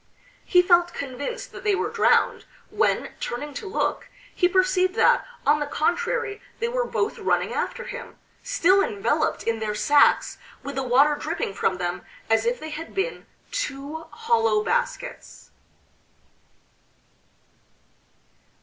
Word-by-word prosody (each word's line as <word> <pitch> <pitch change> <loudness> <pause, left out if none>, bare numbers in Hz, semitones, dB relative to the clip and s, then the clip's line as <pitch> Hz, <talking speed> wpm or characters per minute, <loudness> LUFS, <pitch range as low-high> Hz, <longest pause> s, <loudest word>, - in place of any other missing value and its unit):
He 360 -1 +5
felt 350 -1 +3
convinced 280 - -5
that 380 - -10
they 415 -2 +2
were - - -2
drowned, - - +2 0.3
when, - - 0
turning 290 +5 -4
to 410 - -6
look 405 - -2 0.2
he 360 - +2
perceived 370 0 +2
that, - - +4 0.2
on 295 +2 +4
the 295 - -2
contrary, 405 +6 -1 0.2
they 465 - -1
were - - 0
both 415 - -2
running - - 0
after - - -3
him, 485 -1 -8 0.2
still 390 -6 +3
enveloped 410 -3 0
in 230 -1 -1
their 215 -1 -2
sacks 290 +7 +3 0.2
with 280 - -5
the 270 - -2
water 265 +4 +4
dripping 305 -8 -3
from 190 -1 0
them 175 -1 -3 0.3
as 225 +1 +3
if 245 +1 0
they 315 0 -7
had 325 +2 -7
been 390 +6 -2 0.2
two 320 - -4
hollow 225 -2 +1
baskets.... - - -3
330 Hz, 135 wpm, -24 LUFS, 265-405 Hz, 0.3 s, He